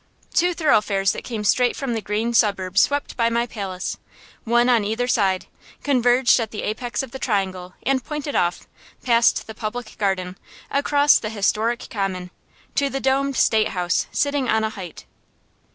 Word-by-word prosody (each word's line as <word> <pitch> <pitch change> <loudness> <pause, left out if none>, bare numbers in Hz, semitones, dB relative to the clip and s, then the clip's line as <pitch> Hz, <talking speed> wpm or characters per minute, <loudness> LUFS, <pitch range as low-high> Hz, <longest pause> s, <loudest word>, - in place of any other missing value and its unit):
Two 355 0 +2
thoroughfares 210 - +2
that - - -6
came 225 -4 -4
straight 245 +4 +2
from 270 -4 -3
the 225 - -2
green 215 +4 -2
suburbs 195 -4 +2
swept 285 0 0
by 230 -1 +2
my 235 +1 0
palace, 195 -5 -5 0.5
one 240 +1 +3
on 240 -4 +4
either 225 +4 -1
side, 195 -6 +1 0.4
converged 250 -2 +3
at 225 -2 -2
the 210 - -6
apex 240 +4 -3
of 265 - -9
the 265 - -7
triangle, 190 -6 -2
and 265 -1 +1
pointed 300 0 -4
off, 175 0 0 0.4
past 235 -2 +3
the 220 - -8
Public 220 +2 -6
Garden, 190 -2 -1 0.3
across 285 +1 +4
the 215 - -4
historic 220 +3 0
Common, 185 -3 -3 0.4
to 280 -1 +1
the 270 - -3
domed 270 +1 +1
State 220 -1 +3
House 175 -1 0
sitting 285 -2 0
on 220 0 +2
a 220 - -1
height. 185 -6 -9
230 Hz, 170 wpm, -22 LUFS, 200-255 Hz, 0.5 s, on